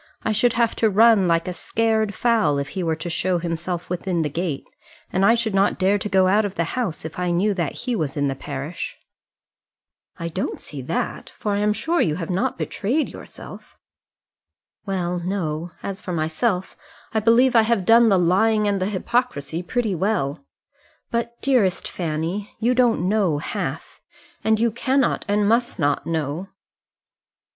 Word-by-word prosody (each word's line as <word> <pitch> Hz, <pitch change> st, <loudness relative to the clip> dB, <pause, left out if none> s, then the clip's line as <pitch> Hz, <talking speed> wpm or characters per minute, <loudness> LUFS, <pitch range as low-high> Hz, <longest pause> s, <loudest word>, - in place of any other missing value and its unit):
I 220 Hz, -, 0 dB
should 230 Hz, +3 st, +2 dB
have 235 Hz, -1 st, +1 dB
to 220 Hz, -, +3 dB
run 215 Hz, -1 st, +5 dB
like 165 Hz, 0 st, +1 dB
a 180 Hz, -, -2 dB
scared 220 Hz, +3 st, 0 dB
fowl 220 Hz, -12 st, +2 dB
if 140 Hz, 0 st, -3 dB
he 185 Hz, -, -4 dB
were 165 Hz, -2 st, 0 dB
to 165 Hz, -, -7 dB
show 175 Hz, +2 st, 0 dB
himself 170 Hz, +1 st, -3 dB
within 180 Hz, -1 st, -1 dB
the 150 Hz, -, -1 dB
gate; 165 Hz, -3 st, -3 dB, 0.5 s
and 190 Hz, -, +2 dB
I 230 Hz, +4 st, +6 dB
should 230 Hz, -3 st, -1 dB
not 195 Hz, +1 st, +2 dB
dare 195 Hz, +2 st, +2 dB
to 210 Hz, -, -4 dB
go 190 Hz, -1 st, +4 dB
out 205 Hz, +3 st, +4 dB
of 200 Hz, -2 st, -4 dB
the 170 Hz, -, +1 dB
house, 215 Hz, -12 st, -3 dB
if 160 Hz, +2 st, -6 dB
I 180 Hz, 0 st, 0 dB
knew 190 Hz, +5 st, +2 dB
that 170 Hz, -7 st, -2 dB
he 250 Hz, -, 0 dB
was 150 Hz, -8 st, -2 dB
in 145 Hz, 0 st, +1 dB
the 135 Hz, -, 0 dB
parish." 135 Hz, -, -6 dB, 1.2 s
"I 170 Hz, -, -4 dB
don't 170 Hz, -, -3 dB
see 145 Hz, -3 st, -8 dB
that, 150 Hz, +7 st, -3 dB
for 210 Hz, -, -2 dB
I 200 Hz, -, 0 dB
am 210 Hz, 0 st, +2 dB
sure 320 Hz, +11 st, 0 dB
you 155 Hz, -, +1 dB
have 165 Hz, +1 st, -4 dB
not 185 Hz, +2 st, 0 dB
betrayed 265 Hz, +10 st, -1 dB
yourself." -, -, -11 dB, 1.1 s
"Well, 180 Hz, -2 st, -1 dB
no; 170 Hz, -3 st, -3 dB
as 195 Hz, -1 st, -5 dB
for 180 Hz, -, -5 dB
myself, 180 Hz, +5 st, -1 dB, 0.4 s
I 220 Hz, -, +2 dB
believe 235 Hz, +4 st, +4 dB
I 225 Hz, -, +8 dB
have 220 Hz, -4 st, +1 dB
done 230 Hz, +2 st, +6 dB
the 195 Hz, -, +4 dB
lying 210 Hz, +5 st, +3 dB
and 200 Hz, -2 st, 0 dB
the 185 Hz, -, +1 dB
hypocrisy 200 Hz, -, -1 dB
pretty 220 Hz, +3 st, -1 dB
well. 180 Hz, -, -1 dB, 0.7 s
But, 235 Hz, 0 st, -2 dB
dearest 230 Hz, -10 st, +2 dB
Fanny, 170 Hz, +4 st, -3 dB
you 235 Hz, +3 st, +2 dB
don't 240 Hz, -7 st, +2 dB
know 195 Hz, -7 st, +2 dB
half; 150 Hz, -, -5 dB, 0.4 s
and 220 Hz, 0 st, +2 dB
you 230 Hz, 0 st, +2 dB
cannot 260 Hz, +3 st, +1 dB
and 205 Hz, 0 st, +2 dB
must 235 Hz, +2 st, +1 dB
not 145 Hz, -3 st, 0 dB
know." 160 Hz, +2 st, -2 dB
195 Hz, 180 wpm, -22 LUFS, 170-225 Hz, 1.2 s, I